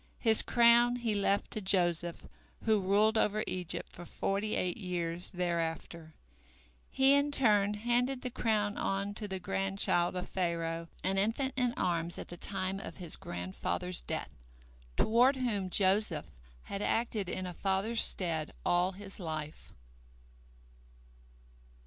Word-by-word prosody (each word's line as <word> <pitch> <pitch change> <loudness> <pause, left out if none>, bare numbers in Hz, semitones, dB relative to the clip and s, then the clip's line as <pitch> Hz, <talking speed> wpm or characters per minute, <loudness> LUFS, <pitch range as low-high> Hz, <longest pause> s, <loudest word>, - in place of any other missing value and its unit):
His 220 -2 +3
crown 240 0 +4
he 235 -3 -2
left 200 0 0
to 215 - -4
Joseph, 175 -3 +1 0.4
who 220 -2 +3
ruled 210 +4 +3
over 215 0 +1
Egypt 180 -2 -3
for 175 - -10
forty 200 +4 -2
eight 180 -1 -1
years 175 -3 -2
thereafter. 170 -2 -3 0.7
He 270 +1 +4
in 285 +1 +3
turn 210 -7 +2
handed 245 +4 0
the 250 - -4
crown 215 -4 -1
on 195 +1 -2
to 210 0 -5
the 190 -1 -4
grandchild 100 - +1
of 180 - -4
Pharaoh, 170 -2 -2 0.2
an 195 +1 +1
infant 235 +6 +1
in 250 -2 0
arms 170 -1 0
at - - -8
the 175 - -7
time 190 +1 +2
of - - -8
his 175 -4 -1
grandfather's 95 - -3
death, 160 - -5 0.7
toward 245 +5 +4
whom 215 -8 -1
Joseph 190 - +1 0.3
had 200 - -5
acted 220 -4 -1
in 185 0 -3
a 180 - -5
father's 195 +5 +1
stead 160 -4 +2
all 175 +2 +2
his 195 +1 -10
life. 155 -3 -6
195 Hz, 135 wpm, -31 LUFS, 175-220 Hz, 0.7 s, crown